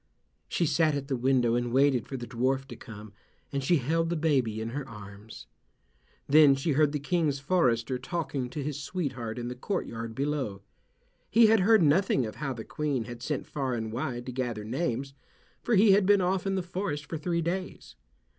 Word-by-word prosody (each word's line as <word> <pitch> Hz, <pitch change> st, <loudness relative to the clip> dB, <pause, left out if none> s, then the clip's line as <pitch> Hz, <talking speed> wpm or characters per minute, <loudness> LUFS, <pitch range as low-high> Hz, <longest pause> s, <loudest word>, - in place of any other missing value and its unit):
She 170 Hz, -, 0 dB
sat 155 Hz, 0 st, +2 dB
at 140 Hz, 0 st, -4 dB
the 135 Hz, -, +1 dB
window 125 Hz, -1 st, +2 dB
and 120 Hz, 0 st, 0 dB
waited 130 Hz, -2 st, +3 dB
for 135 Hz, -, -5 dB
the 120 Hz, -, -6 dB
dwarf 130 Hz, +3 st, -1 dB
to -, -, -7 dB
come, 105 Hz, -1 st, -11 dB, 0.4 s
and 140 Hz, -1 st, -2 dB
she 170 Hz, +6 st, +3 dB
held 165 Hz, +5 st, 0 dB
the 170 Hz, -, 0 dB
baby 135 Hz, -9 st, +1 dB
in 110 Hz, +1 st, -3 dB
her 135 Hz, +2 st, -5 dB
arms. 105 Hz, 0 st, -11 dB, 0.8 s
Then 145 Hz, -1 st, +7 dB
she 135 Hz, +4 st, -1 dB
heard 150 Hz, +1 st, +3 dB
the 150 Hz, -, -1 dB
King's 150 Hz, -1 st, 0 dB
forester 130 Hz, -5 st, +1 dB
talking 140 Hz, -3 st, -3 dB
to 145 Hz, +3 st, -5 dB
his 145 Hz, 0 st, -4 dB
sweetheart 130 Hz, -9 st, -4 dB
in 120 Hz, -1 st, -4 dB
the 125 Hz, -, -4 dB
courtyard 115 Hz, -, -4 dB
below. 135 Hz, -8 st, -2 dB, 0.7 s
He 230 Hz, +1 st, +6 dB
had 220 Hz, 0 st, +5 dB
heard 210 Hz, 0 st, +5 dB
nothing 150 Hz, -4 st, +3 dB
of 110 Hz, -, -7 dB
how 145 Hz, -3 st, -3 dB
the 115 Hz, -2 st, -8 dB
Queen 145 Hz, -5 st, -2 dB
had 120 Hz, 0 st, -9 dB
sent 145 Hz, +2 st, -3 dB
far 135 Hz, -4 st, -2 dB
and 110 Hz, -1 st, -4 dB
wide 120 Hz, +1 st, -3 dB
to 130 Hz, -, -5 dB
gather 120 Hz, -4 st, -3 dB
names, 130 Hz, +2 st, -2 dB, 0.5 s
for 240 Hz, -, +1 dB
he 205 Hz, +1 st, +6 dB
had 195 Hz, -1 st, +4 dB
been 205 Hz, 0 st, +6 dB
off 185 Hz, +1 st, 0 dB
in 195 Hz, -, 0 dB
the 190 Hz, -, -1 dB
forest 175 Hz, -4 st, -4 dB
for 160 Hz, -, -5 dB
three 170 Hz, +1 st, -1 dB
days. 185 Hz, +3 st, -4 dB
140 Hz, 200 wpm, -28 LUFS, 120-165 Hz, 0.8 s, Then